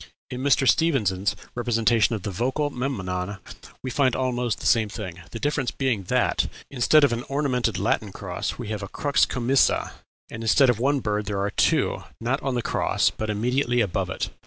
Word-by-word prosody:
In 125 - -4
Mr. 135 -1 +3
Stephens's 105 - +2 0.2
representation 115 -1 +2
from 95 - -12
the 100 - -3
Vocal 130 - -1
Memnon 100 -7 -3 0.5
we 130 - -3
find 130 -1 +2
almost 125 -3 -1
the - - -8
same 110 -3 +3
thing, 90 -5 -7
the 115 - -7
difference 145 -2 0
being 120 -8 -1
that, - - +1 0.2
instead 140 +4 +4
of 140 - +4
an 120 - -2
ornamented 140 -3 0
Latin - - 0
cross, - - -4
we - - -6
have 105 -1 -3
a 100 - -5
crux 140 +7 +1
commissa, 125 +2 +2 0.4
and 115 - -6
instead 125 +3 +5
of 115 - -4
one 140 +2 +1
bird 105 -2 -2
there 100 -1 -2
are 100 +1 -1
two, - - +1 0.2
not 125 +5 -1
on 135 -2 -2
the 120 - -1
cross, - - +1
but 110 - -5
immediately 120 +4 0
above 100 -7 0
it. - - -3
120 Hz, 185 wpm, -24 LUFS, 105-135 Hz, 0.5 s, instead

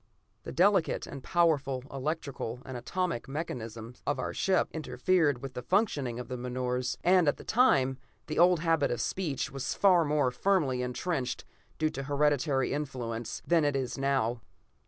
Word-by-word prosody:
The - - -5
delicate 190 -1 +2
and 140 -2 -9
powerful 145 -7 +1
electrical 135 -4 -4
and 130 - -7
atomic 170 +3 -2
mechanism 115 -6 -5
of 145 0 +1
our 130 - -3
ship 190 -2 +2
interfered 160 -4 +1
with 135 -1 -6
the 125 - -5
functioning 145 - 0
of 125 -1 -6
the 125 - -4
menores, 125 0 -2
and 180 -2 +5
at 145 - +2
that - - -12
time 135 - +3 0.3
the 155 - -3
old 175 -1 +5
habit 165 -3 +2
of 120 - -2
speech 165 -8 -2
was 135 -1 -3
far 185 -4 +5
more 145 -4 +1
firmly 145 -7 +1
entrenched, 125 +2 -2 0.3
due 155 -1 +1
to 135 - -5
hereditary 140 -1 +1
influence, 125 -6 -4
than 170 -2 +3
it 145 -1 +1
is 130 -2 -2
now. 135 -4 0
140 Hz, 160 wpm, -30 LUFS, 125-165 Hz, 0.3 s, and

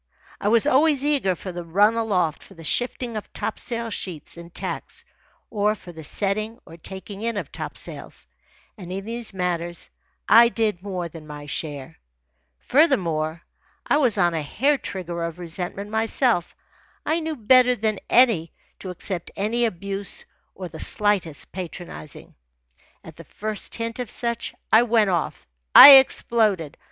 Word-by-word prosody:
I - - -2
was 225 +3 +4
always 290 0 +3
eager 275 -11 +1
for 185 - -7
the 175 0 -6
run 200 +6 +3
aloft 195 -9 0
for 195 - -16
the 165 - -12
shifting 245 +5 -1
of 215 - -6
topsail 230 +1 -4
sheets 175 -7 -5
and 170 0 -11
tacks, - - -6 0.5
or 210 0 +1
for 180 - -12
the 160 -2 -11
setting 215 +7 -1
or 165 - -12
taking 190 +4 -9
in 230 -1 -2
of - - -5
topsails; - - -7 0.5
and 180 -2 -8
in 195 +1 -5
these 230 0 -4
matters 175 -2 -3 0.4
I 235 +2 +7
did 220 -6 -1
more 185 -3 -4
than 160 -1 -12
my 145 -1 -9
share. 145 0 -4 0.6
Furthermore, 170 - +1 0.4
I - - +2
was 255 -7 +2
on 175 -1 +2
a 160 - -1
hair 270 - 0
trigger 175 -3 -5
of 170 0 -4
resentment 180 +4 -6
myself. 225 -3 0 0.5
I 320 +2 +1
knew 320 -1 -4
better 250 +1 +4
than 215 -3 -1
to 200 -5 +1
accept 180 0 -5
any 230 +4 0
abuse 200 -1 -3 0.3
or 185 - -6
the 160 -1 -11
slightest 200 -8 0
patronizing. 175 -4 -8 0.7
At - - -13
the - - -10
first 215 -1 -4
hint 230 +1 -4
of 245 -3 -4
such, 235 -2 -4 0.2
I 220 - +8
went 225 -4 +2
off 170 -3 -2 0.3
I 280 -1 +13
exploded. 215 - +1
200 Hz, 150 wpm, -23 LUFS, 175-230 Hz, 0.7 s, I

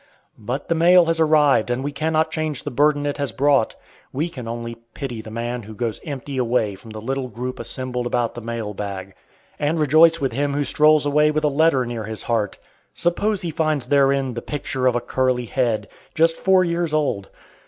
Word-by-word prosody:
But 125 +6 -4
the - - +2
mail 175 +2 +6
has 165 0 0
arrived 150 -7 +4
and 125 +2 -1
we 145 - -2
cannot 155 +2 0
change 155 -4 -2
the - - -4
burden 145 +2 +2
it 145 - -2
has 140 -4 -1
brought. 140 -2 +2 0.4
We 155 +6 -2
can 125 -8 -8
only 115 0 -5 0.2
pity 125 -5 -5
the 110 - -10
man 120 +2 -4
who 110 0 -11
goes 115 -1 -3
empty 140 -2 -5
away 115 -4 +1
from 105 +4 -13
the 110 0 -7
little 130 +3 -3
group 125 +2 -6
assembled 125 -2 -4
about 120 -1 0
the 120 - -7
mail 115 -2 -4
bag, 95 -1 -6 0.5
and 150 +3 0
rejoice 160 +3 +5
with 135 -3 -1
him 140 +3 -1
who 145 - +1
strolls 150 +2 +4
away 150 +1 +3
with 155 0 -1
a 150 - +3
letter 145 -3 +3
near 115 -2 -4
his 110 0 -5
heart. 110 -4 -1 0.4
Suppose 200 +4 0
he 170 - -3
finds 155 -5 -1
therein 140 -2 +3
the 120 - -5
picture 135 -3 -2
of 125 - +2
a 120 - 0
curly 125 0 0
head. 120 -2 -1 0.3
Just 165 +1 +3
four 190 0 +3
years 170 -2 -1
old! 135 -10 -1
135 Hz, 205 wpm, -22 LUFS, 120-155 Hz, 0.5 s, mail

